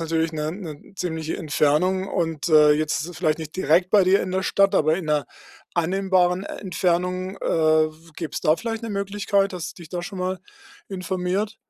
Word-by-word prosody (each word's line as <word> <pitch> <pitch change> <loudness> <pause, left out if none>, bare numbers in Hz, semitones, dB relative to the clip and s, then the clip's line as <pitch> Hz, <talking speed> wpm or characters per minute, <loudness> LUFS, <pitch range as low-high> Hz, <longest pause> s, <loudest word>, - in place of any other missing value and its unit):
natürlich 165 0 +1
'ne 155 -1 -2
'ne 165 -4 -9
ziemliche 160 -3 -3
Entfernung, 175 +4 +1
und, 165 -1 -2
äh, 150 -1 +7
jetzt 155 +1 0
ist 155 - -5
es 175 - -10
vielleicht 155 -3 +1
nicht 160 +1 -8
direkt 180 +2 +2
bei 205 -3 +5
dir 190 +2 +4
in 185 - -4
der 190 +1 0
Stadt 195 0 +3
aber 155 +1 +3
in 175 -4 -5
'ner 150 -2 +1 0.5
annehmbaren 185 +1 +1
Entfernung, 185 0 -1
äh, - - -33
w 155 0 +1
gäbe 165 -3 -5
es - - -3
da 155 - +4
vielleicht 225 -1 -4
'ne 230 - -4
Möglichkeit, 200 0 0
hast 175 -3 -5
du - - -10
dich 160 - -12
da 175 -1 -3
schon 190 +2 -7
mal 185 +1 -2 0.5
informiert? 190 +3 -2
180 Hz, 195 wpm, -23 LUFS, 155-190 Hz, 0.5 s, äh